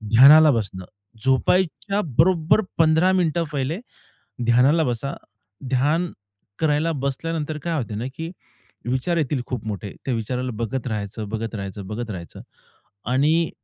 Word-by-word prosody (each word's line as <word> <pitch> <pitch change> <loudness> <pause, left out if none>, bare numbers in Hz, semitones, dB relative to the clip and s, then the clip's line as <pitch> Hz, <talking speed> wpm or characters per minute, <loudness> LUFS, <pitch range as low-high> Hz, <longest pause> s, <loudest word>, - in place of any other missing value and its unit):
ध्यानाला 150 +5 +9
बसणं 100 -6 -3 0.4
झोपायच्या 185 +8 +1 0.2
बरोबर 170 +3 +4 0.2
15 160 +3 +4
मिनिटं 170 -2 +1
पहिले 145 +5 -2 0.7
ध्यानाला 130 +7 +4
बसा, 125 0 -2 0.6
ध्यान 150 +7 +1 0.5
करायला 155 +1 +1
बसल्यानंतर 150 +2 -3
काय 170 -1 -1
होत 120 -5 -4
ना, 115 - -3
की 165 +2 -5 0.5
विचार 130 +8 0
येतील 145 -4 0
खूप 125 -4 -4
मोठे 100 -1 -5
त्या 130 - 0
विचाराला 125 +3 -3
बघत 120 +3 -3
राहायचं, 105 -1 -4
बघत 115 +1 -4
राहायचं, 100 -1 -6
बघत 110 +2 -5
राहायचं. 85 -3 -8 0.7
आणि 155 +6 +3
135 Hz, 130 wpm, -23 LUFS, 115-160 Hz, 0.7 s, ध्यानाला